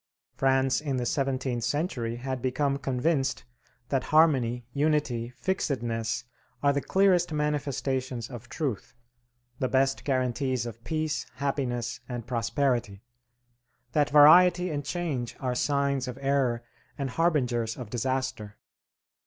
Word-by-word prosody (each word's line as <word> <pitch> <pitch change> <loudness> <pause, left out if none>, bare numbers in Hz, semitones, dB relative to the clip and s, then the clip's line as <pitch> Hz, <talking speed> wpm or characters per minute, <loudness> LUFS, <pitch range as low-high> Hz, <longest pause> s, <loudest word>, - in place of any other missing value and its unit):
France 135 0 +2
in 140 -4 -2
the 125 - -1
seventeenth 130 -3 -1
century 120 -3 -1
had 130 +1 -4
become 140 +2 0
convinced 135 +1 0 0.5
that 135 -2 0
harmony, 130 -7 +3
unity, 140 -6 0
fixedness, 120 -10 -1 0.4
are 140 0 +4
the 140 - 0
clearest 185 -2 +3
manifestations 135 -5 -2
of 120 -2 -10
truth, 135 - -4 0.6
the 130 - +1
best 135 +1 +1
guarantees 130 -2 0
of 115 0 -8
peace, 155 -1 -2
happiness, 125 -3 -2
and 120 -2 -5
prosperity; 120 -3 -1 0.9
that 145 +2 +2
variety 175 +4 +7
and 145 -1 -2
change 145 -6 -3
are 130 -2 -1
signs 140 0 0
of 125 0 -5
error 135 -4 +1 0.3
and 135 -3 -3
harbingers 125 -9 +1
of 120 -5 -8
disaster. 130 -4 -2
135 Hz, 120 wpm, -28 LUFS, 120-145 Hz, 0.9 s, variety